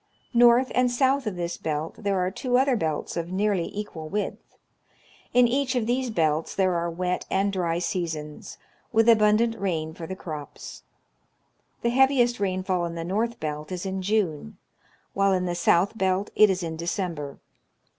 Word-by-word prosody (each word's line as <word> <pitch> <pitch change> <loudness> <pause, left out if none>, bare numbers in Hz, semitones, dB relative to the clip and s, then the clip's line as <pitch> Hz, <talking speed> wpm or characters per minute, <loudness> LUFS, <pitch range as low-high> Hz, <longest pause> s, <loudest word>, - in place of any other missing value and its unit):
North 240 +2 +5
and 250 0 +3
south 265 +1 +1
of 205 - -2
this 175 -1 -3
belt 155 +1 -3
there 200 -2 0
are 180 0 0
two 245 +4 0
other 265 0 +3
belts 160 -8 -2
of 170 +1 -3
nearly 195 -2 0
equal 175 -7 -6
width. 205 +3 -4 0.7
In 245 0 +5
each 260 +1 0
of 240 -3 +1
these 250 +2 0
belts 160 -6 0
there 190 -2 +2
are 170 0 -1
wet 180 +2 -2
and 195 +1 +1
dry 170 -3 0
seasons, 160 -4 -4 0.3
with 225 0 +3
abundant 225 0 +4
rain 160 -5 -2
for 165 -1 -8
the 190 - -5
crops. 155 -6 -8 1.0
The 235 - +2
heaviest 255 -2 +3
rainfall 185 -2 0
in 170 0 -5
the 165 - -4
north 220 +7 -1
belt 150 0 -5
is 180 +1 -4
in 190 0 -3
June, 200 -1 -1 0.6
while 195 0 +3
in 180 -1 0
the 175 - -1
south 175 +4 +2
belt 190 -1 0
it 215 - +6
is 185 -1 -1
in 160 -1 -4
December. 165 -4 -3
190 Hz, 170 wpm, -25 LUFS, 170-225 Hz, 1.0 s, it